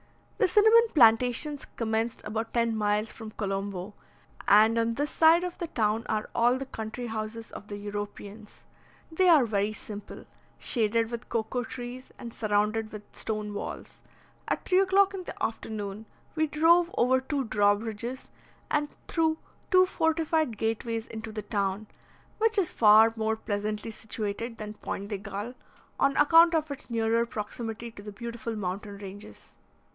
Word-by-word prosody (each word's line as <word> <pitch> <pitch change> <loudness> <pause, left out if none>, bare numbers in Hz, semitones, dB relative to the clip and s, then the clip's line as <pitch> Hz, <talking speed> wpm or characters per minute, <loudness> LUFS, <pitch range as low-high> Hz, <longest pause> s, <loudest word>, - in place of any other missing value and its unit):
The - - +4
cinnamon 440 +5 +6
plantations 250 +3 +4
commenced 225 0 -1
about 220 +2 -4
ten 230 -1 +2
miles 210 0 0
from 225 -2 -8
Colombo; 195 -2 -4 0.5
and 220 +3 +6
on 230 0 0
this 290 +3 -1
side 330 +2 +5
of 360 -1 -5
the 345 - -3
town 220 -6 0
are 215 -1 -1
all 240 +2 +3
the 270 - -5
country 225 0 -6
houses 225 0 -5
of 205 - -9
the 205 - -6
Europeans. 205 +1 -7 0.5
They 365 +3 +3
are 305 -7 +6
very 205 -1 0
simple, 210 -1 -9 0.3
shaded 230 -1 0
with 235 0 -6
cocoa 230 +2 -1
trees 245 +2 -8
and 235 -1 -8
surrounded 215 +1 0
with 210 -1 -8
stone 210 -1 -3
walls. 205 - -7 0.5
At - - -2
3 365 - +4
o'clock 390 +1 +4
in 380 -2 -5
the - - -7
afternoon, 215 -1 -4 0.3
we 315 0 +1
drove 335 +3 +4
over 260 +2 +3
two 275 +1 -2
draw 205 -3 +3
bridges 225 +4 -6 0.4
and 295 -1 +1 0.2
through 320 -1 +1 0.3
two 370 -2 +6
fortified 320 - 0
gateways 225 +1 -2
into 220 0 -7
the 215 -1 -5
town, 200 0 -1 0.5
which 450 0 +2
is 375 -5 +2
far 220 +1 +6
more 220 0 0
pleasantly 210 0 -3
situated 220 +1 -5
than 210 0 -6
Pointe 200 -1 -6
de 205 -3 -3
Galle, 205 +3 -6 0.5
on 275 0 +2
account 330 +3 +6
of 310 -2 0
its 280 -1 -6
nearer 230 0 +2
proximity 225 +1 -5
to 200 - -12
the 210 +1 -8
beautiful 235 +2 -5
mountain 200 +1 -4
ranges. 200 +1 -11
225 Hz, 155 wpm, -28 LUFS, 210-270 Hz, 0.5 s, cinnamon